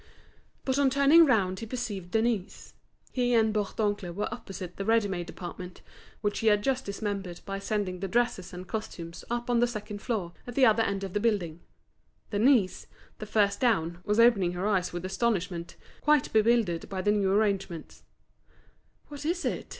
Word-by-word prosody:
But 265 +1 +1
on 280 -1 +4
turning 280 +5 +6
round 190 -7 +2
he 225 - -6
perceived 210 -7 -4
Denise. 220 -2 -1 0.4
He 245 -1 +1
and 220 -1 +3
Bourdoncle 205 -2 -1
were 210 +3 -2
opposite 190 -6 -8
the 195 - -3
ready 225 0 +3
made 175 -3 -4
department, 180 0 -8 0.4
which 205 -1 -1
he 225 - 0
had 210 -1 +4
just 265 +1 0
dismembered 200 -3 -4
by 195 0 -4
sending 195 -3 -2
the 195 - -3
dresses 235 -3 0
and 180 +1 -8
costumes 180 -7 -6
up 240 0 -2
on 240 -1 +2
the 240 - +4
second 210 -3 -6
floor 195 -8 -2
at 245 - -7
the 270 - +6
other 220 0 +4
end 200 -3 -1
of 190 -2 -5
the 205 - +1
building. 195 -8 0 0.7
Denise, 215 -2 +2 0.3
the 215 - -6
first 200 -2 +2
down, 175 -9 +1
was 210 +4 +1
opening 205 -7 +5
her 180 +2 -3
eyes 190 -4 +1
with 175 +1 -5
astonishment, 185 -4 -1 0.3
quite 300 -2 +2
bewildered 220 -6 +2
by 190 -1 -3
the 205 - +3
new 200 -2 +2
arrangements. 195 -5 -1 1.1
"What 290 -1 -8
is 345 +4 -1
it?" - - -2
205 Hz, 175 wpm, -28 LUFS, 185-235 Hz, 1.1 s, turning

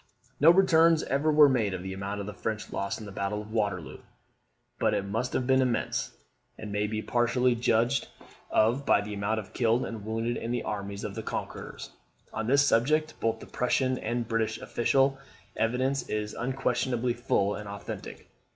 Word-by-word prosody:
No 150 - +7
returns 165 -3 +5
ever 140 +4 +1
were 150 -1 +8
made 110 -8 +1
of 90 - -6
the 95 0 -5
amount 100 +1 -4
of - - -5
the 105 - -6
French 110 +1 -4
loss 100 +1 -2
in 110 - -8
the 100 - -8
battle 100 +1 -2
of 110 - -13
Waterloo; 100 - -2 0.8
but - - +2
it 95 - -1
must 115 +5 -2
have 125 - 0
been 130 +1 +4
immense, 125 -3 -1 0.5
and 105 -1 -7
may 105 +1 0
be 110 0 -3
partially 125 +1 +2
judged 115 0 +1 0.4
of 120 +6 +2
by 140 - +4
the 105 0 -6
amount 105 +2 -1
of 100 - -10
killed 120 0 +2
and 110 -3 -6
wounded 115 +2 -2
in 115 - -4
the 120 0 -1
armies 100 -1 -4
of - - -4
the - - -4
conquerors. - - -6 0.4
On 110 0 -3
this 140 +3 +5
subject 155 +6 +2
both 115 0 -1
the - - -8
Prussian 130 +1 0
and 120 0 -2
British 115 -1 0
official 135 +3 +1 0.4
evidence 130 +5 +1
is 105 0 -2
unquestionably 125 -1 -1
full 105 -4 +1
and 105 -1 -6
authentic. 100 0 -7
115 Hz, 185 wpm, -28 LUFS, 105-130 Hz, 0.8 s, were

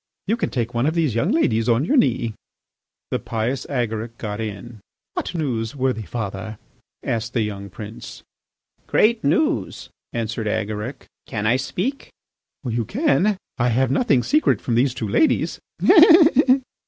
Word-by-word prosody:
You 215 - +1
can 235 - -2
take 120 -2 -2
one 120 +4 +1
of 160 - 0
these 160 -8 +1
young 115 - +1
ladies 115 -7 +1
on 120 +5 +2
your 285 - +1
knee." 120 - +2 0.8
The - - 0
pious 115 +4 -3
Agaric 115 -3 -3
got 105 -1 -5
in. 110 +1 -7 0.3
"What - - -4
news, 120 -7 -2
worthy 130 -5 -1
father?" 105 -1 -5 0.5
asked 115 0 -2
the 115 - +1
young 100 -1 -5
prince. 105 +3 -9 0.6
"Great 220 0 +3
news," 300 - 0 0.2
answered 115 -1 -3
Agaric. 110 +4 -3 0.2
"Can 105 -2 -3
I 115 +4 +3
speak?" 205 - -3 0.5
"You 120 -2 -1
can. 210 - +1 0.2
I 120 +1 +2
have 130 +2 +1
nothing 135 - +2
secret 305 +1 +2
from 120 - -3
these 125 +2 +2
two 110 - -3
ladies." 305 - +1
120 Hz, 145 wpm, -22 LUFS, 110-140 Hz, 0.8 s, Great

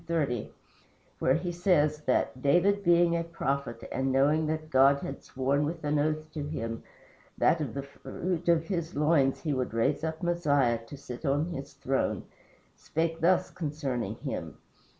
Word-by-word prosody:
30, 145 -9 -1 0.7
where 130 - +3
he 175 +1 -2
says 170 -4 +2
that 130 0 +1
"David 185 +8 +3
being 170 -1 +4
a 170 - 0
prophet, 140 -7 -3
and 135 +1 0
knowing 150 +4 +3
that 155 0 -3
God 135 +1 +6
had 135 - -6
sworn 135 +2 0
with 160 +2 -3
an 150 0 +1
oath 155 +1 -1
to 155 - -4
him 115 -6 -4 0.6
that 165 - +3
of 140 -5 -4
the 140 - -3
fruit 170 +5 -4
of 165 -1 +3
his 170 -2 -3
loins 145 -2 +2
he 155 -3 -1
would 130 -3 -2
raise 135 +7 +1
up 160 +1 -3
Messiah 145 -9 +2
to 145 - -9
sit 125 -2 -8
on 145 +4 +1
his 135 -4 -6
throne, 135 -1 -1 0.5
spake 165 +1 -2
thus 180 +2 +3
concerning 145 -7 -3
him." - - -5
150 Hz, 165 wpm, -29 LUFS, 135-165 Hz, 0.7 s, God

